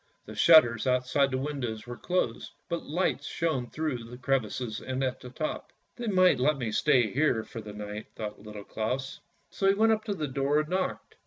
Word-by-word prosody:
The 110 - -9
shutters 120 -2 +6
out 125 0 +2
side 140 +2 +2
the 130 - -1
windows 130 -6 -3
were 120 0 -6
closed, 175 -7 -2 0.2
but 170 - -1
lights 175 +5 0
shone 155 -8 -1
through 150 -7 -3
the 120 +2 -10
crevices 125 -3 -1
and 130 +1 -3
at 130 -1 -1
the 125 - -9
top.: 155 +5 -4
' - - -46
They 240 -1 -4
might 185 -6 +4
let 145 +3 +3
me 120 -4 -2
stay 120 -2 +3
here 135 -4 +2
for 115 0 -8
the 105 -1 -8
night," 105 +1 -6
thought 105 -2 -6
Little 105 -1 -9
Claus, 125 +6 -3 0.3
so 195 - 0
he 195 - +5
went 225 +2 +4
up 215 -1 +1
to 205 -2 -2
the 155 -4 -2
door 140 +3 +1
and 155 - -7
knocked. 185 +1 -2
130 Hz, 215 wpm, -29 LUFS, 115-155 Hz, 0.3 s, shutters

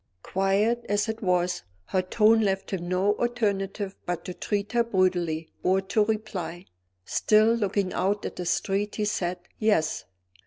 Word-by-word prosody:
Quiet 200 +5 +1
as 205 +2 +1
it 220 +1 -4
was, 180 -2 +1 0.2
her 185 - +1
tone 215 +4 +4
left 195 -2 -1
him 175 -2 -3
no 190 +3 +2
alternative 205 -4 -1
but 175 -1 -3
to 180 - -5
treat 205 +2 -2
her 240 -1 +3
brutally 180 -6 0
or 185 +1 +3
to 195 +3 +1
reply. 210 -5 -3 0.4
Still 215 +1 +4
looking 200 -4 0
out 200 +3 0
at - - -4
the 180 - -4
street, 200 +3 0
he 210 - 0
said 180 -3 -1 0.2
"Yes." 205 -8 +1
195 Hz, 155 wpm, -26 LUFS, 185-215 Hz, 0.4 s, tone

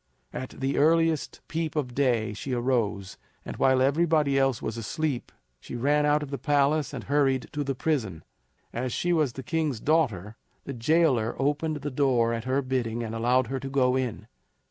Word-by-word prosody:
At 130 - -6
the 135 +1 0
earliest 165 0 +2
peep 160 -1 -3
of 130 -5 -2
day 120 -6 +1
she 130 +5 -5
arose, 115 -6 -1 0.3
and - - -6
while 130 -1 +3
everybody 150 0 +2
else 135 -3 +2
was 110 - -4
asleep, 130 +4 -3 0.3
she - - -8
ran 145 +4 +2
out 150 0 +2
of 140 - -8
the 140 - -4
palace 145 +2 +2
and - - -6
hurried 135 -2 +1
to 145 - -2
the 135 -1 -2
prison. 115 - -2 0.5
As 125 +2 -2
she 175 +7 0
was 150 -7 +1
the 135 - -7
king's 145 -1 -1
daughter, 115 - 0 0.3
the 140 - -6
jailer 130 -3 +2
opened 145 +2 -1
the 145 - -3
door 125 -4 +2
at 115 0 -4
her 135 +2 0
bidding 120 -3 -2
and 110 -1 -5
allowed 120 +3 +2
her 135 +3 -3
to 135 +1 -6
go 130 -2 +2
in. 130 -4 -2
135 Hz, 185 wpm, -27 LUFS, 120-150 Hz, 0.5 s, while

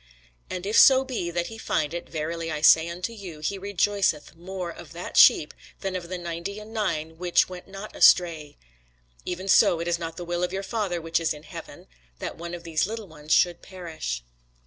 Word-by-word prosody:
And 180 0 -5
if 210 +2 +4
so 265 0 +7
be 240 -10 -3
that 175 0 -1
he 225 +3 -8
find 150 -7 -1
it, 175 - -6
verily 165 +1 -3
I 150 -1 -3
say 160 +1 +6
unto 180 +7 -4
you, 185 -8 -9
he 195 +6 -3
rejoiceth 200 -5 0
more 180 +1 -6
of - - -12
that - - -7
sheep, - - +6 0.3
than 195 -1 -3
of 175 -2 -5
the 185 - -3
ninety 175 +4 -5
and 215 +1 -11
nine 160 -7 -2
which 175 -1 +3
went 180 -1 -10
not 195 +2 -9
astray. 160 -5 +4 0.7
Even 185 +2 -4
so 175 -3 +5
it 170 - -3
is 170 0 0
not 165 -1 -6
the 175 - -6
will 175 0 -2
of 180 - -1
your 195 +1 -3
Father 195 -5 -2
which 165 0 0
is 165 -2 -1
in 150 - -13
heaven, - - -10 0.3
that - - -5
one 170 +1 -6
of 170 - -10
these 165 0 0
little 220 -1 -6
ones 155 -2 -11
should 175 0 +4
perish. 160 - -6
175 Hz, 210 wpm, -26 LUFS, 165-195 Hz, 0.7 s, so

